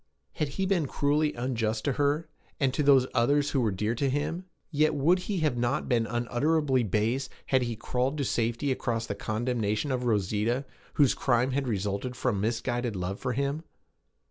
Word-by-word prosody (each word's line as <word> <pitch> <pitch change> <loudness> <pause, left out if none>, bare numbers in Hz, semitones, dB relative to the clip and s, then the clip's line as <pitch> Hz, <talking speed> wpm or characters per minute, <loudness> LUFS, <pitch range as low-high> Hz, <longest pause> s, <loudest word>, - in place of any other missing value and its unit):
Had 150 - -1
he 190 - +1
been 180 -6 +1
cruelly 150 +3 +1
unjust 115 -3 -1
to 140 - +2
her, 145 +3 +1 0.3
and 135 -2 +2
to 145 - 0
those 140 -3 +5
others 145 +4 +2
who 135 - +1
were 115 - +2
dear 105 +3 -1
to 135 +3 0
him? 155 +6 -2 0.3
Yet 155 0 +2
would 165 +6 +3
he 200 -3 0
not 120 -3 0
have - - -9
been 115 -2 +2
unutterably 130 +4 +1
base 115 +5 0 0.2
had 130 -1 +2
he 120 -2 -2
crawled 125 +5 -1
to 140 - -1
safety 120 +4 0
across 115 -3 -1
the 100 - -3
condemnation 110 +3 -1
of 125 -1 -1
Rosita, 110 +4 0 0.3
whose 140 -4 +5
crime 125 0 +1
had 135 0 -1
resulted 105 +3 -2
from 120 -6 -1
misguided 120 +1 -1
love 90 +1 -3
for 125 -1 -2
him? 140 +5 -1
125 Hz, 180 wpm, -28 LUFS, 115-145 Hz, 0.3 s, those